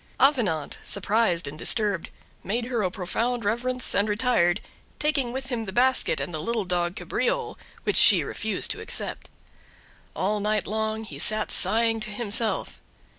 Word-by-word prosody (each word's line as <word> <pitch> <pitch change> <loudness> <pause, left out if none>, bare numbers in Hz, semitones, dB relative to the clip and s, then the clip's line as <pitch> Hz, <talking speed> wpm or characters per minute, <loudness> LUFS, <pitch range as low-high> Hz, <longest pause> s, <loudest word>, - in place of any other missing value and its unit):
Avenant, 225 - +2
surprised 200 -5 +1
and 150 +2 -8
disturbed, 205 -5 +1 0.3
made 230 +5 -2
her 240 -2 -1
a 185 - +1
profound 230 +6 -2
reverence 250 +4 0
and 205 +2 +1
retired, 210 -5 +2 0.4
taking 290 -5 0
with 265 +1 -5
him 230 -2 -2
the 190 - -5
basket 255 +4 +2
and 175 - -4
the 155 - -2
little 225 +3 -2
dog 175 0 -1
Cabriole, 445 - -2 0.3
which - - +1
she - - +7
refused - - -1
to - - -3
accept. - - -5 0.9
All 210 +3 0
night 210 -1 0
long 220 +1 -2
he 220 - -9
sat 215 0 +3
sighing 225 +4 +3
to 215 0 -4
himself. 220 +1 -2
220 Hz, 155 wpm, -25 LUFS, 190-240 Hz, 0.9 s, she